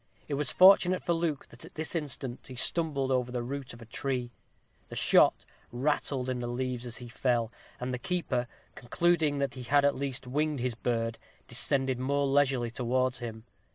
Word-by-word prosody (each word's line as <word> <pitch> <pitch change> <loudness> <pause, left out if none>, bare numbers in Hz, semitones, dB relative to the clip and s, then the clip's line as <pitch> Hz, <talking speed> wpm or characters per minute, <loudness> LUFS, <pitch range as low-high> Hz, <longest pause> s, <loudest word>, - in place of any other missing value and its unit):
It 150 - -4
was 140 -2 +1
fortunate 185 -1 +6
for 170 - +1
Luke 165 -4 -1
that 120 - -13
at - - -13
this 160 0 -2
instant 135 -6 -4
he 130 - -9
stumbled 140 -1 0
over 125 -1 +1
the 125 -1 -2
root 135 +1 -5
of 120 0 -11
a - - -12
tree 125 +1 -2 0.6
the - - -9
shot - - +4 0.3
rattled 135 0 0
in 130 -1 -2
the 120 - -3
leaves 125 0 -3
as 120 - -4
he 125 - -7
fell, 120 -2 0 0.3
and 125 +1 -3
the 125 - -3
keeper, 130 -6 -1 0.3
concluding 155 +3 +1
that 140 -1 -1
he 130 - -8
had 140 +3 +3
at 145 - +4
least 135 -2 -4
winged 150 +3 -1
his 125 0 -1
bird, 115 -1 -2 0.3
descended 130 +1 +1
more 140 +2 +1
leisurely 135 -4 +2
towards 130 +1 0
him. 110 -2 -6
130 Hz, 190 wpm, -30 LUFS, 120-145 Hz, 0.6 s, fortunate